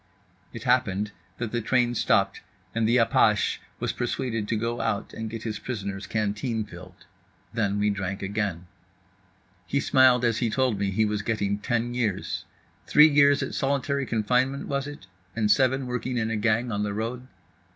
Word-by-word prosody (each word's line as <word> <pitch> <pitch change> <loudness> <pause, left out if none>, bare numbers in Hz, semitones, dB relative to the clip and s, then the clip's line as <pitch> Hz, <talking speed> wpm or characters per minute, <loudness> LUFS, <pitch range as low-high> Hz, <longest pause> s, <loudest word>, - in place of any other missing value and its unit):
It - - -8
happened 105 -5 +1 0.3
that 115 -2 -4
the 120 - -1
train 120 +1 +2
stopped 110 -4 +1 0.3
and 115 -1 +1
the 120 - +4
apache 115 -2 +3 0.2
was - - -1
persuaded 120 -3 -2
to 115 - 0
go 115 +2 -2
out 115 -3 -2
and 110 -1 -5
get 115 0 -6
his 110 -2 -4
prisoner's 100 -5 -5
canteen 110 +2 -1
filled. - - -13 0.5
Then 100 -3 0
we 105 0 +2
drank 95 -1 -4
again. 100 -3 -2 1.0
He 140 - +1
smiled 130 -2 +4
as 115 -1 +1
he 120 - +1
told 125 -3 +1
me 100 -1 0
he 110 +3 +2
was 105 -1 -1
getting 100 -1 -1
ten 120 +2 -1
years. 115 -6 -2 0.4
Three 150 +1 +7
years 140 -1 +5
at - - -5
solitary 140 0 0
confinement 125 +5 0
was 140 0 -2
it, 145 -10 -9 0.3
and 110 -2 +2
seven 130 +4 +3
working 125 0 -3
in 110 -1 0
a - - 0
gang 115 +3 +1
on 105 -1 -1
the 105 -1 -2
road? 120 +4 -4
115 Hz, 170 wpm, -26 LUFS, 105-125 Hz, 1.0 s, Three